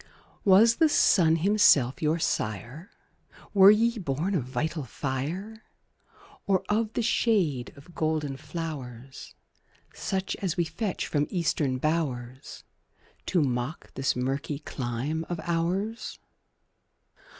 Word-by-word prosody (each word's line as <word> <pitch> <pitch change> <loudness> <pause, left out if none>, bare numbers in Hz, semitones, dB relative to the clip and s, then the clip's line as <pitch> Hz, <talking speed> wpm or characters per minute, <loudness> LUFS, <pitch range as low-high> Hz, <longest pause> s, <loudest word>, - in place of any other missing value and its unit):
Was 215 +4 +6
the 320 - +4
sun 165 - +4
himself 165 - +4
your 155 +1 +2
sire? 120 - -3 0.6
Were 195 -1 +8
ye 230 +2 +3
born 165 +3 -2
of 150 -10 0
vital 155 +4 -3
fire? 155 - -4 0.8
Or 195 -1 +2
of 215 +1 0
the 240 - -1
shade 190 - +1
of 140 +5 -16
golden 155 -4 -1
flowers, 135 -5 -7 0.6
Such 190 0 -3
as 185 -4 -2
we 175 - +2
fetch 200 +4 -3
from 145 -1 0
Eastern 155 -7 0
bowers, 130 -4 -3 0.6
To 175 -5 +2
mock 125 +3 -3
this 135 0 0
murky 135 +3 -2
clime 140 +2 -3
of 175 -2 -3
ours? 180 +6 -2
160 Hz, 115 wpm, -27 LUFS, 135-190 Hz, 0.8 s, Were